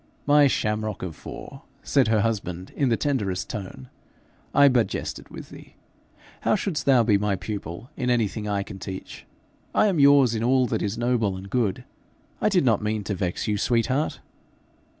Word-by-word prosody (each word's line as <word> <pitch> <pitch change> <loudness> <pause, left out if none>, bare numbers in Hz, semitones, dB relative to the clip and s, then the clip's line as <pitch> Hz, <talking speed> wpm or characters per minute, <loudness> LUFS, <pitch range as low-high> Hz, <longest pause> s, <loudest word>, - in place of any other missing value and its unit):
'My 145 0 +6
shamrock 105 -5 -1
of 85 -4 -5
four!' - - -10 0.2
said 135 -4 +2
her 110 -1 +3
husband 95 -5 -3
in 140 -3 +1
the 115 - +2
tenderest 105 -7 -1
tone, 95 - -7 0.6
'I 140 0 +6
but 120 -4 +3
jested - - -5
with - - -10
thee. - - -14 0.6
How - - +2
shouldst 190 -8 -3
thou 130 -4 +6
be 105 -3 +3
my 105 -1 0
pupil 95 - -6
in 125 - -2
anything 110 -3 0
I 100 -1 -1
can 100 -1 -10
teach? 95 0 -8 0.5
I - - +5
am 190 -6 +1
yours 140 -4 +6
in 110 0 -2
all 130 +1 +3
that 120 - -2
is 105 +2 -2
noble 120 -5 0
and 95 +1 -10
good. 115 -7 0 0.6
I - - +3
did 180 -8 +2
not 115 -4 +3
mean 105 0 -2
to 100 - -3
vex 90 +1 -2
you, 105 -1 0
sweet 115 +1 +2
heart.' 140 +4 -1
110 Hz, 185 wpm, -25 LUFS, 100-130 Hz, 0.6 s, My